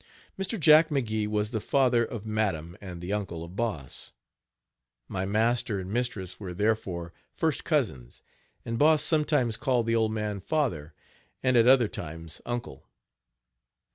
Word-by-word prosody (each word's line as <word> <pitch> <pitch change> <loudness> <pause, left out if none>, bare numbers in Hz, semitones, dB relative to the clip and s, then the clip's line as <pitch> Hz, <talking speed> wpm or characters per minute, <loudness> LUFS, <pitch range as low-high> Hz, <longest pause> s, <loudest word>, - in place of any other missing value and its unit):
Mr. 195 +3 -2
Jack 155 +1 +7
McGee 110 -7 -1
was 105 0 -1
the 110 - -1
father 125 0 +2
of 115 -2 -6
madam 95 -7 -1
and 90 -4 -8
the 90 +3 -3
uncle 95 -6 -3
of 85 +2 -10
Boss. 100 - -3 0.9
My 95 -1 -3
master 110 0 +1
and 95 +1 -6
mistress 115 -7 -2
were 90 -4 -6
therefore 95 -5 -1 0.2
first - - 0
cousins, 60 -2 -1 0.4
and 115 0 -3
Boss 155 +1 +5
sometimes 150 -7 +2
called 125 -4 +1
the 115 0 +1
old 110 -1 +2
man 105 -2 -2
father 90 - -2 0.5
and 130 -1 +3
at 115 0 +5
other 130 -3 +6
times, 80 -3 -7
uncle. 120 - -5
110 Hz, 145 wpm, -28 LUFS, 90-125 Hz, 0.9 s, Jack